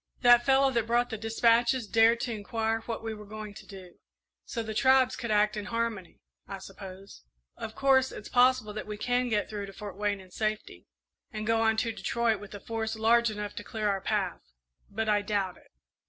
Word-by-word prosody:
That 240 -1 +7
fellow 270 +1 +4
that 235 -3 0
brought 240 +1 +1
the 220 - -3
despatches 230 +2 +2
dared 225 +2 +4
to 240 - -2
inquire 225 +1 -2
what 230 -1 -4
we 225 -1 -3
were 210 -1 -9
going 215 0 -7
to - - -13
do 185 -3 -12 0.5
so 230 - -4
the 220 0 -5
tribes 260 +2 +4
could 245 -3 -5
act 210 0 +3
in 210 -1 -4
harmony, 230 -5 -3 0.3
I 195 - -6
suppose! 195 0 -11 0.3
Of 220 -1 -7
course, 265 -1 +3
it's 210 - -8
possible 245 -4 +3
that 215 - -6
we 210 0 -5
can 245 +2 0
get 210 -2 0
through 205 -2 -5
to 195 - -10
Fort 205 -3 -8
Wayne 205 0 -1
in 185 -1 -15
safety, 215 +2 -4 0.4
and 215 -3 -5
go 225 0 +2
on 220 0 +2
to 230 0 0
Detroit 225 +2 0
with 205 0 -10
a - - -7
force 220 +1 -3
large 235 +1 +3
enough 210 -1 -5
to - - -5
clear 215 0 -2
our 195 -1 -1
path 195 -3 -1 0.5
but 220 +2 -3
I 210 -1 +3
doubt 200 -3 -2
it." - - -23
220 Hz, 210 wpm, -29 LUFS, 205-235 Hz, 0.5 s, That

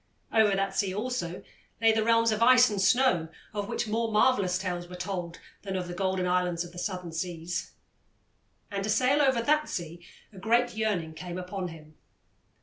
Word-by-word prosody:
Over 215 -3 +4
that 195 0 -1
sea, 190 -2 0
also, 210 -6 -3 0.4
lay 225 0 +5
the 220 0 +1
realms 230 0 +3
of 215 +1 -1
ice 250 0 +6
and 200 -2 -1
snow, 190 -6 +3 0.3
of 205 -1 -3
which - - -2
more 225 +1 -1
marvellous 205 -5 +3
tales 180 -2 -4
were 180 - -9
told 180 -2 -5 0.2
than 195 -2 -5
of 180 -1 -2
the 175 - -6
golden 190 0 -1
islands 180 -1 +1
of 175 - -10
the 175 - -8
Southern 180 -3 -4
Seas. 170 +1 -4 1.0
And 200 -1 -2
to 215 - -3
sail 255 +7 +3
over 260 -4 +3
that 300 +4 +2
sea 170 0 -5 0.3
a 190 - -11
great 235 +4 +2
yearning 200 -8 -1
came 175 +2 -7
upon 185 +1 -4
him. 155 -2 -12
195 Hz, 185 wpm, -28 LUFS, 175-225 Hz, 1.0 s, ice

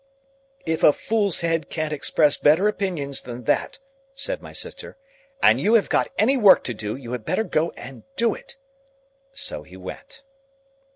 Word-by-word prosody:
"If 160 -1 -1
a 150 - +7
fool's 205 -3 -1
head 165 -3 -1
can't 155 -1 -3
express 150 0 +2
better 160 +8 +4
opinions 175 -10 -2
than 125 0 -8
that," - - 0 0.4
said - - -4
my - - -11
sister, - - -7 0.5
"and - - +5
you 220 +3 +4
have 220 - +3
got - - +1
any 260 +6 +3
work 210 -6 +6
to 125 - -3
do, 105 -1 -4
you 125 -3 -9
had 125 -3 -4
better 220 - 0
go 165 -5 0
and 130 0 -10
do 230 -1 +2
it." 270 - -12 0.8
So 280 +1 -3
he 90 - -14
went. 95 - -10
160 Hz, 170 wpm, -23 LUFS, 135-220 Hz, 0.8 s, a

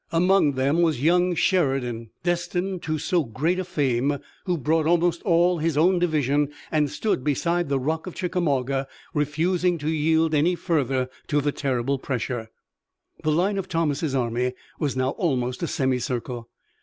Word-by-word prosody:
Among 175 -3 +3
them 140 +6 +1
was 160 -6 +1
young 175 +2 +3
Sheridan, 135 - 0
destined 175 +1 -1
to 155 -1 -2
so 170 +3 +1
great 150 +10 -1
a - - -1
fame, 140 -5 0 0.3
who 180 -3 0
brought 155 +2 +1
almost 170 0 +2
all 175 -1 +3
his 160 -1 0
own 175 +3 +4
division 145 -4 +1 0.2
and 150 -2 +2
stood 150 -1 -1
beside 170 +3 0
the 140 - +2
Rock 160 +6 -2
of 180 - -7
Chickamauga, 140 -7 0 0.3
refusing 170 +4 +1
to 150 -1 -5
yield 160 +1 +2
any 160 +4 +3
further 135 -7 0 0.2
to 145 - +2
the 145 0 0
terrible 135 -1 -1
pressure. 120 -3 -3 0.7
The 155 - +2
line 190 +6 +1
of 190 -1 -5
Thomas' 155 -3 0
army 125 0 0 0.3
was 140 -4 -1
now 130 0 +1
almost 125 -7 -1
a 170 - -1
semicircle. 125 -3 -2
155 Hz, 155 wpm, -24 LUFS, 135-175 Hz, 0.7 s, own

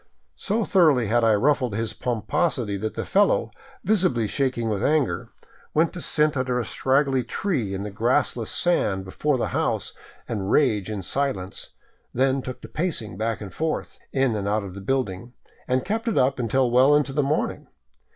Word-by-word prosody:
So 215 +2 -1
thoroughly 150 - +4
had 120 +1 +3
I 110 -1 +5
ruffled 125 -1 +1
his 115 0 -2
pomposity 120 -1 -1
that 110 +2 -4
the - - -3
fellow, - - +2 0.3
visibly 180 - +2
shaking 125 -1 -1
with 105 -3 -1
anger, 150 -3 +1 0.5
went 160 +2 +3
to 175 - -6
sit 150 -1 +2
under 130 -2 0
a 120 - -2
scraggly 135 -1 +1
tree 120 - -2
in 95 - -4
the 105 - -5
grassless 120 +1 0
sand 100 - +1
before 140 +9 0
the - - -1
house - - -1 0.3
and 100 -4 -3
rage 110 -9 +2
in 105 -3 -4
silence, 100 -5 -3 0.4
then 135 +2 +2
took 130 -1 -7
to - - -9
pacing 150 - -3
back 110 +3 -2
and 100 -3 -8
forth, 160 0 -3
in 135 -4 +1
and 100 -1 -2
out 105 +1 0
of 95 -2 -7
the 100 - -8
building, 120 -1 -2 0.3
and 130 0 0
kept 225 +3 -2
it 225 - 0
up 130 +1 +2
until 125 +1 +1
well 130 +4 +5
into 145 -2 +1
the 145 - +2
morning. 145 +2 -1
125 Hz, 180 wpm, -24 LUFS, 110-145 Hz, 0.5 s, I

